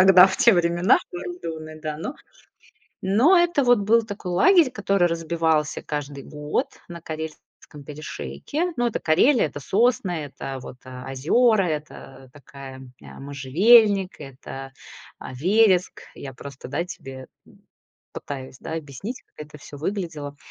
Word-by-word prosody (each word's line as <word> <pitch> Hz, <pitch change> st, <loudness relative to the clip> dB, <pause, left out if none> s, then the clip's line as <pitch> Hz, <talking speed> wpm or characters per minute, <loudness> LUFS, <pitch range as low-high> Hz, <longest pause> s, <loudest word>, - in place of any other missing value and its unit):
тогда, 185 Hz, -1 st, +8 dB
в 190 Hz, -, -3 dB
те 235 Hz, -, +6 dB
времена, 170 Hz, -1 st, +1 dB, 1.0 s
да, 155 Hz, -1 st, -3 dB
но 255 Hz, -, -5 dB, 0.9 s
но 230 Hz, -, +4 dB
это 345 Hz, -5 st, +3 dB
вот 245 Hz, -2 st, +5 dB
был 220 Hz, +3 st, +4 dB
такой 205 Hz, -4 st, -6 dB
лагерь, 320 Hz, -, +5 dB
который 200 Hz, -5 st, +1 dB
разбивался 165 Hz, -2 st, 0 dB
каждый 145 Hz, -2 st, -5 dB
год 150 Hz, -, -2 dB, 0.2 s
на 170 Hz, -1 st, -9 dB
Карельском 155 Hz, -2 st, -9 dB
перешейке. 295 Hz, -, -4 dB
Ну, 240 Hz, -, +2 dB
это 235 Hz, -, -2 dB
Карелия, 195 Hz, -, +4 dB
это 145 Hz, -, -8 dB
сосны, 230 Hz, -, +1 dB
это 135 Hz, -1 st, -7 dB
вот, 125 Hz, -, -10 dB
э, 125 Hz, 0 st, -9 dB
озера, 200 Hz, -, +3 dB
это 150 Hz, -3 st, -7 dB
такая, 135 Hz, -1 st, -11 dB
м, 130 Hz, -1 st, -13 dB
а, -, -, -12 dB
можжевельник, 185 Hz, -, +4 dB
это, 135 Hz, 0 st, -9 dB, 0.5 s
а, -, -, -8 dB
вереск. 185 Hz, -, +2 dB
Я 135 Hz, -1 st, -8 dB
просто, 140 Hz, 0 st, -10 dB
да, 155 Hz, +5 st, -2 dB
тебе, 135 Hz, -7 st, -9 dB, 0.2 s
м, -, -, -21 dB, 0.5 s
пытаюсь, 130 Hz, -2 st, -7 dB
да, 160 Hz, -, -6 dB
объяснить, 165 Hz, -, -6 dB
как 150 Hz, -, -11 dB
это 150 Hz, -, -13 dB
всё 145 Hz, -, -11 dB
выглядело. 160 Hz, -5 st, -4 dB
165 Hz, 140 wpm, -23 LUFS, 140-210 Hz, 1.0 s, тогда